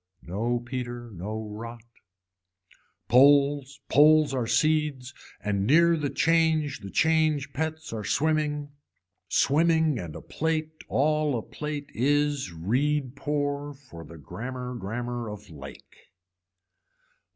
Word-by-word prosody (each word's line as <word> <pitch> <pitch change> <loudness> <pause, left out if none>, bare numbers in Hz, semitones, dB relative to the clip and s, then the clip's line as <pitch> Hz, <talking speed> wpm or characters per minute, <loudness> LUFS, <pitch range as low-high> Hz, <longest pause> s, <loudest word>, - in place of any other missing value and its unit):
No 115 +7 -1
peter 120 -2 -5
no 105 +4 -5
rot. 115 +2 -8 1.2
Poles 140 +1 +4
poles 155 0 +5
are 125 -3 -1
seeds 150 -3 +1 0.3
and 100 -1 0
near 170 +5 +5
the 150 -3 -2
change 160 -4 +2
the 100 -2 -8
change 155 0 +2
pets 160 -1 -4
are 110 -2 -4
swimming 150 +2 0 0.6
swimming 160 -2 +3
and 80 -5 -7
a - - -7
plate 155 0 -3
all 150 -1 +1
a 110 - -4
plate 150 -1 -6
is 145 -3 +1
reed 130 - -1
pour 145 0 -2
for 125 -12 -12
the 85 0 -12
grammar 125 - -6
grammar 120 +2 -4
of 105 -4 -10
lake. 70 -2 -13
140 Hz, 115 wpm, -27 LUFS, 115-150 Hz, 1.2 s, poles